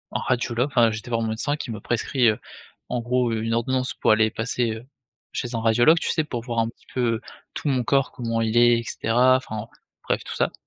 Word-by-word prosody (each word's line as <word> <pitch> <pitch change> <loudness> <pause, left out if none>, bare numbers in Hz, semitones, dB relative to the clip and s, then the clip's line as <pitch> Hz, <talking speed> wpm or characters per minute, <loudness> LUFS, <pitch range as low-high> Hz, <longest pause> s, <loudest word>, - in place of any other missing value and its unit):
un - - +1
radiologue. 125 0 0
Enfin, 120 -5 +3
j'ai 110 - -4
été 120 - -12
voir 115 -1 0
mon 110 - -1
médecin 135 +7 -1
qui 130 -5 -6
ma 110 - -6
prescrit, 120 +1 +1
heu, 105 - -1 0.5
en 120 - -1
gros 125 0 +1
une 115 0 -1
ordonnance 130 +2 0
pour - - 0
aller 110 0 +4
passer, 115 +1 -1
heu, 110 +3 -9 0.5
chez 120 -1 -3
un - - -1
radiologue. 120 +8 +5
Tu - - -2
sais, 160 - +1
pour 125 -6 -4
voir 120 -2 -2
un 115 0 +1
petit - - -19
peu, 125 - -1
heu, 115 - -6 0.3
tout - - -4
mon 130 -2 +1
corps, 135 +2 +1
comment 115 -2 -2
il 110 0 -1
est, 120 0 +6
et - - -5
cetera, 125 +4 +3
enfin 110 -4 -6 0.4
bref, - - 0
tout - - -7
ça, - - +1
120 Hz, 240 wpm, -24 LUFS, 115-125 Hz, 0.5 s, est